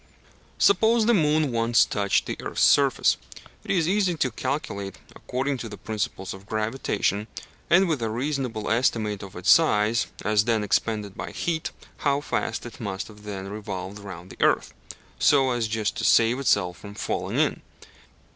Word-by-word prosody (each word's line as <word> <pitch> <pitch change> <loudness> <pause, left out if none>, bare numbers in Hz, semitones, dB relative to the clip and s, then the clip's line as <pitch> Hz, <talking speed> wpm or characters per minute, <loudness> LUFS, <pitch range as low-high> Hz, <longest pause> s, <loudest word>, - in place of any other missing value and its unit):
Suppose 230 - +4
the 235 - +4
moon 155 - +2
once 115 0 +3
touched 100 -1 0
the - - -3
earth's - - -1
surface, - - +4 0.5
it - - -14
is 170 -5 +2
easy 190 -2 +2
to 135 -5 0
calculate, 110 -6 -4 0.2
according 135 +1 -3
to 115 - -6
the 105 - -8
principles 105 -3 -4
of 95 +1 -13
gravitation, 110 -2 -1 0.4
and 185 +3 +5
with 155 -7 -1
a 115 - -1
reasonable 125 -3 -2
estimate 110 -3 +1
of 95 -2 -10
its 90 +1 +2
size 115 -8 +4 0.2
as 105 0 +3
then 115 -3 +1
expanded 105 0 -1
by - - -5
heat, 160 -2 -2 0.3
how 140 -1 +1
fast 120 -6 -3
it 120 - -10
must 105 0 -5
then 100 -2 -5
have 95 +1 -7
revolved 100 -1 -6
round 95 -2 -9
the - - -11
earth, - - +2 0.5
so 135 -3 +4
as 120 -2 0
just 110 -1 -1
to - - -3
save 115 +3 +4
itself 100 -9 +1
from 100 0 -10
falling - - -3
in. - - +1
110 Hz, 165 wpm, -25 LUFS, 105-140 Hz, 0.5 s, and